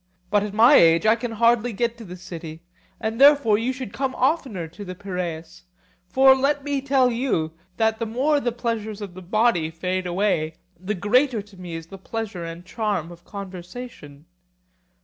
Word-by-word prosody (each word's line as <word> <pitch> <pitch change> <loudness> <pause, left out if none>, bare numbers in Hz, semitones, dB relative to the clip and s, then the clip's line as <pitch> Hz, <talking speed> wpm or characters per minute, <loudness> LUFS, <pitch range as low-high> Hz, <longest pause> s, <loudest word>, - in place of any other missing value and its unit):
But 205 0 +4
at 205 0 -4
my 235 +6 +7
age 165 +4 +5
I 220 +1 +6
can 235 0 -5
hardly 235 +1 +2
get 235 +2 -1
to - - -8
the 180 -3 -9
city, 165 -2 -9 0.4
and 225 +3 -3
therefore 280 -7 +6
you 240 +3 0
should 255 -6 -7
come 265 -1 -2
oftener 255 - 0
to 175 +6 -10
the 185 -2 -7
Piraeus. 175 -3 -6 0.4
For 265 +7 +6
let 280 +2 +1
me 285 -1 -1
tell 265 -2 +3
you, 230 -10 -1 0.3
that 220 -1 +1
the 230 - -2
more 275 +7 +1
the 240 -3 -1
pleasures 225 -3 -3
of 200 -3 -7
the 185 - -10
body 190 -3 +1
fade 180 +3 -3
away, 175 -4 0 0.2
the 195 +4 -3
greater 230 +4 +2
to 205 -1 -18
me 180 -2 -7
is 165 0 -6
the 195 +3 -11
pleasure 200 -3 -5
and 165 +1 -8
charm 195 -5 -2
of 170 0 -13
conversation. 185 - -9
210 Hz, 185 wpm, -23 LUFS, 180-240 Hz, 0.4 s, my